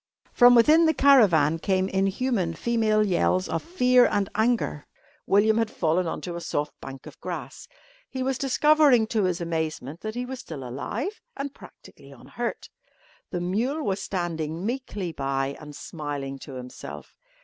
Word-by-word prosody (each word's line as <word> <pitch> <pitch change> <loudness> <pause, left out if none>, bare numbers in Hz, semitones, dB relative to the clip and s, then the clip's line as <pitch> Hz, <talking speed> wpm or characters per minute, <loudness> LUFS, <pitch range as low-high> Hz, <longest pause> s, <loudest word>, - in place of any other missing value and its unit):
From 245 -1 +7
within 310 +8 +6
the 320 - +2
caravan 180 - +5
came 190 +1 +1
inhuman 195 -1 0
female 215 +1 +1
yells 185 -1 +1
of - - -2
fear 250 -7 +4
and 200 -1 0
anger. 220 -8 0 0.4
William 215 +3 +4
had 225 -1 0
fallen 170 0 0
on - - -4
to 175 -2 -5
a 170 - -5
soft 150 -2 -2
bank 135 0 -9
of - - -12
grass. - - -7 0.4
He 260 -1 -3
was 265 -1 -1
discovering, 280 -3 +4
to 220 -2 0
his 180 -2 -1
amazement, 160 -3 -3
that 215 +1 -5
he 245 +1 -3
was 260 0 -6
still 140 - -7
alive 230 - -4 0.2
and 275 0 -4
practically - - -15
unhurt. - - -6 0.6
The 175 - -3
mule 235 - -1
was 195 0 -1
standing 170 -2 -3
meekly 220 -7 -3
by 135 -1 -2
and 150 -1 -10
smiling 145 -3 -6
to 135 0 -9
himself. 125 0 -9
195 Hz, 160 wpm, -25 LUFS, 160-245 Hz, 0.6 s, From